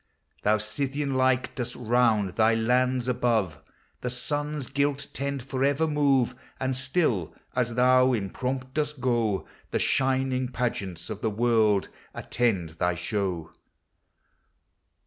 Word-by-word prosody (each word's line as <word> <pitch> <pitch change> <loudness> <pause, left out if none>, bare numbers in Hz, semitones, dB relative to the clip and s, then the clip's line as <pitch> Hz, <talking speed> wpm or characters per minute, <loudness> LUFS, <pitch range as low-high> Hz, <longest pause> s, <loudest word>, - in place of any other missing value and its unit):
Thou, 105 +1 +3
Scythian 135 +6 -2
like, 130 0 +2
dost 125 -1 -4
round 115 -4 +2
thy 110 +3 +3
lands 125 +2 +1
above 110 - 0 0.4
The 125 - -2
Sun's 145 +2 -2
gilt 140 0 0
tent 140 -1 -3
forever 135 +3 +1
move, 140 -5 +2 0.3
xVnd 130 0 0
still, 130 - 0 0.2
as 120 -2 0
thou 130 +1 +5
in 100 -6 -1
pomp 130 0 -3
dosl 150 -2 -2
go, 115 -6 0 0.2
The - - 0
shining 130 -1 +1
pageants 105 -8 -3
of 105 - -6
the 110 - +1
world 110 -2 +2 0.3
attend 95 -10 -1
thy 90 0 +1
show. 90 -2 -2
125 Hz, 125 wpm, -27 LUFS, 110-130 Hz, 0.4 s, thou